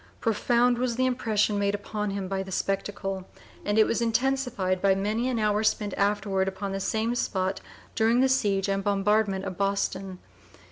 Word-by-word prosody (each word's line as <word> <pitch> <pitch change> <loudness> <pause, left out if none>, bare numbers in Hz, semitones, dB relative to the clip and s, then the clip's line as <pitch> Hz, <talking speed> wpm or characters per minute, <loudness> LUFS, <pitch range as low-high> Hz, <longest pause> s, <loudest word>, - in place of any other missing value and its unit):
Profound 240 +2 +2
was 245 -2 0
the 255 +2 +1
impression 220 -5 +1
made 200 0 +1
upon 210 0 -4
him 195 -1 -3
by 190 0 -2
the 190 0 -7
spectacle, 195 -1 -2 0.4
and 205 +1 0
it 220 - +7
was 230 - 0
intensified 235 -6 0
by 195 -1 +4
many 215 +6 -1
an 250 - -1
hour 210 -1 +1
spent 210 -2 0
afterward 200 -1 +1
upon 195 +1 -4
the 195 - -2
same 220 +4 0
spot 190 -5 -1 0.3
during 225 +2 +3
the 265 - +5
siege 205 -7 +1
and 195 0 -1
bombardment 200 -1 +1
of 185 -1 -6
Boston. 195 -1 -1
205 Hz, 175 wpm, -27 LUFS, 195-225 Hz, 0.4 s, it